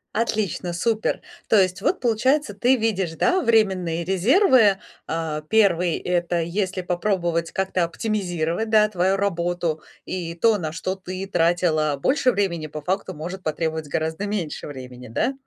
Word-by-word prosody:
Отлично, 215 -6 -1
супер. 220 +5 0 0.3
То 220 - +5
есть 185 +1 +1
вот, 370 - +1
получается, 250 +2 +1
ты 245 +6 +3
видишь, 195 -7 -1
да, 370 - +2
временные 190 - +2
резервы. 215 - +4 0.3
А, 160 -2 -2
1- 180 -6 +3
это 175 -1 -1
если 185 +2 -2
попробовать 175 -2 -1
как-то 190 -2 0
оптимизировать, 175 0 -2
да, 215 -1 +5
твою 190 0 +1
работу. 175 -4 -1 0.2
И 170 -2 -4
то, 215 +4 +3
на 160 -3 -3
что 180 +4 -3
ты 185 0 -6
тратила 165 -4 +1
больше 260 - +2
времени, 170 -7 -1
по 155 0 -7
факту 185 +2 -2
может 175 +5 -6
потребовать 160 0 -2
гораздо 160 +7 -2
меньше 195 -7 -3
времени, 125 -3 -9
да? 115 - 0
185 Hz, 145 wpm, -23 LUFS, 165-210 Hz, 0.3 s, То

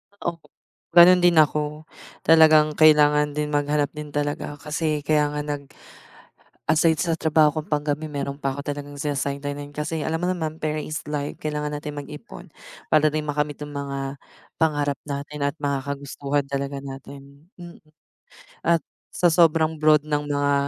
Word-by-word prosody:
Oo, 170 -4 -4 0.6
ganun 180 +1 +9
din 175 -1 +4
ako, 150 0 +2 0.4
talagang 155 -1 +6
kailangan 150 -1 +5
din 150 0 -2
maghanap 145 0 0
din 150 0 -7
talaga 145 0 -2
kasi 150 0 -2
kaya 150 -1 +3
nga 150 - -1
nag 145 -2 -5 1.0
aside 160 0 +3
sa 170 -2 0
trabaho 155 -1 +3
kong - - -21
panggabi 150 +1 -1
meron 140 0 -5
pa 135 - 0
'ko 140 +1 -5
talagang 145 0 -5
sina-sideline-nan 145 0 -3
kasi 150 +1 -3
alam 160 +2 -1
mo 175 - -2
naman 160 -3 -2
pera 155 0 -2
is 155 +1 -4
life, 145 -1 -4
kailangan 150 -1 -3
natin 150 0 -7
mag-ipon 150 -4 -11 0.4
para 155 0 +5
din 155 +1 -2
makamit 150 0 -2
yung 145 - -7
mga 140 0 -5 0.4
pangarap 145 -4 +1
natin 145 +1 -5
at 140 - -2
mga 140 -1 0
kagustuhan 140 0 -2
talaga 140 0 -3
natin. 140 +2 -11
Mm, 175 -1 -11 0.8
at 170 -1 +3 0.3
sa 180 - +1
sobrang 160 -1 +4
broad 155 -1 +4
ng 150 -1 0
mga 145 0 +1
150 Hz, 155 wpm, -23 LUFS, 145-155 Hz, 1.0 s, ganun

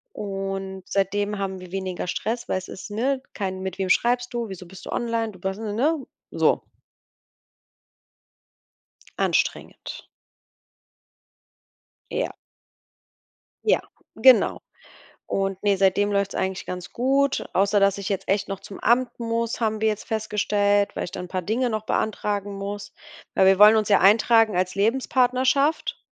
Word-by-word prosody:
Und 195 -1 -4
seitdem 205 +1 -1
haben 190 -1 -3
wir 180 0 -12
weniger 190 -2 -3
Stress, 225 +6 -3
weil - - 0
es 185 - -7
ist, 190 - -8
ne, 260 +6 -1
kein: 190 -2 -3
„Mit 190 -1 -5
wem 190 -1 -2
schreibst 245 +4 +2
du, 235 -1 -2
wieso 190 -2 -8
bist 185 +2 -12
du - - -7
online?“ 230 -2 -1
Du 185 - -15
bas 190 +2 -3
ne 215 -1 -4
ne? 280 +6 0 0.3
So. - - +2 2.6
Anstrengend. - - -1 2.1
Ja. - - -2 1.3
Ja. - - +3 0.3
Genau. - - +5 0.7
Und 195 -1 -2
ne, 205 -1 +3
seitdem 195 +2 +2
läuft's 200 -1 0
eigentlich 190 0 -2
ganz 180 -1 -6
gut, 275 +3 +1
außer 200 +2 +3
dass 195 0 +3
ich 200 - -4
jetzt 195 -2 -2
echt 195 0 +1
noch 195 - -4
zum 195 - -10
Amt 240 +2 +2
muss, 230 0 -2
haben 220 -1 0
wir 220 - +3
jetzt 215 -1 -2
festgestellt, 205 -2 +1
weil - - -2
ich 175 - -7
da 185 - -5
'n 180 - -7
paar 185 0 -3
Dinge 235 +7 0
noch 215 -1 -3
beantragen 205 -2 -1
muss. 200 +1 -6 0.4
Weil 190 - +4
wir 190 0 +5
wollen 210 +2 +8
uns 215 -1 +1
ja 205 - +5
eintragen 220 +1 +5
als 185 0 0
Lebenspartnerschaft 255 +6 +1
205 Hz, 150 wpm, -24 LUFS, 195-230 Hz, 2.6 s, wollen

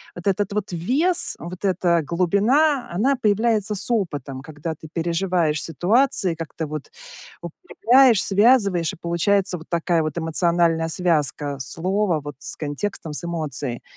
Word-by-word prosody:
Вот 175 +2 -7
этот 200 +1 0
вот 205 -2 -3
вес, 285 - +1
вот 180 +3 -7
эта 175 -3 +2
глубина, 210 - +2
она 250 +10 +2
появляется 215 -2 +1
с 200 - -4
опытом, 145 - -2
когда 155 +2 -6
ты 160 0 -12
переживаешь 170 -2 0
ситуации, 185 - +1
как-то 160 0 -6
вот 150 -1 -7 0.5
укрепляешь, 255 - +3
связываешь, 200 -5 +3
и - - -14
получается 180 +2 0
вот 160 - -14
такая 170 -1 +1
вот 155 0 -4
эмоциональная 165 0 +1
связка 150 -4 0
слова 180 +5 -1
вот 145 -2 -8
с - - -6
контекстом, 155 +2 -4
с 150 - -4
эмоцией. 150 -7 -4
175 Hz, 140 wpm, -22 LUFS, 160-205 Hz, 0.5 s, укрепляешь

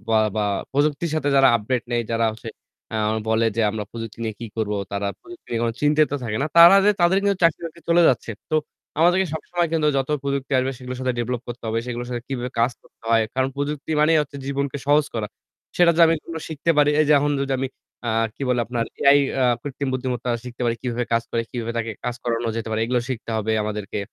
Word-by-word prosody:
বা 110 -1 +4 0.2
বা 105 - +1 0.3
প্রযুক্তির 145 +3 +1
সাথে 145 -2 0
যারা 135 0 +7
আপডেট 120 +3 -2
নেই 120 - +1
যারা 115 0 +1
হচ্ছে 115 +1 -9 0.5
আ - - 0 0.3
বলে 110 +1 +2
যে - - +2
আমরা 105 -1 -4
প্রযুক্তি 115 -1 -7
নিয়ে 110 -2 -3
কি 115 - -5
করবো, 105 -2 -1 0.2
তারা 100 0 -1
প্রযুক্তি 355 0 -14
নিয়ে 115 -1 -1
কোন 115 - 0
চিন্তিত 150 +1 +3
থাকে 105 -2 -2
না। - - +1
তারা 170 +3 +10
যে 210 - +6
তাদের 175 +2 +4
কিন্তু 200 -1 +2
চাকরি 165 -2 +4
বাকরি 165 +1 -12
চলে 170 +1 +5
যাচ্ছে। 120 -2 0 0.2
তো - - 0 0.4
আমাদেরকে 180 +3 +4
সবসময় 175 +2 -1
কিন্তু 160 -2 +2
যত 135 -1 0
প্রযুক্তি 140 -1 -3
আসবে 130 +1 +1
সেগুলোর 125 0 -7
সাথে 130 -1 0
ডেভেলপ 120 +1 -2
করতে 120 0 -7
হবে। 115 +1 0
সেগুলোর 120 0 -4
সাথে 120 -1 -4
কিভাবে 125 -2 -3
কাজ 120 +2 +3
করতে - - -27
হয়। 115 -1 +5
কারণ 130 0 +1
প্রযুক্তি 145 +1 -3
মানেই 160 +2 +4
হচ্ছে 145 -1 -9
জীবনকে 140 0 -2
সহজ 145 +1 +4
করা। 110 -2 -2 0.5
সেটা 175 -1 +6
যদি 170 - +6
আমি 165 - +3
কোন 165 - -8
শিখতে 160 +1 -1
পারি। 150 0 +5
এই - - +5
যে 150 - +6
এখন 145 +1 +1
যদি 135 0 -1
আমি 135 0 -1 0.4
আ - - +1 0.3
কি - - -8
বলে 125 -1 +2
আপনার 120 0 -1 0.2
AI 140 +1 +6 0.2
আ - - +4 0.2
কৃত্রিম 140 -1 -4
বুদ্ধিমত্তা 125 -1 -2
শিখতে 125 0 -7
পারি 115 -1 +1
কিভাবে 120 -1 -2
কাজ 115 - +3
করে, 115 - 0
কিভাবে 115 -1 -4
তাকে 115 0 -2
কাজ 125 - -1
করানো 115 -1 -1
যেতে 115 - -4
পারে। 110 - -1
এগুলো 125 +1 0
শিখতে 120 -3 -5
হবে 110 0 -1
আমাদেরকে। 105 -1 -4
125 Hz, 225 wpm, -23 LUFS, 115-150 Hz, 0.5 s, তারা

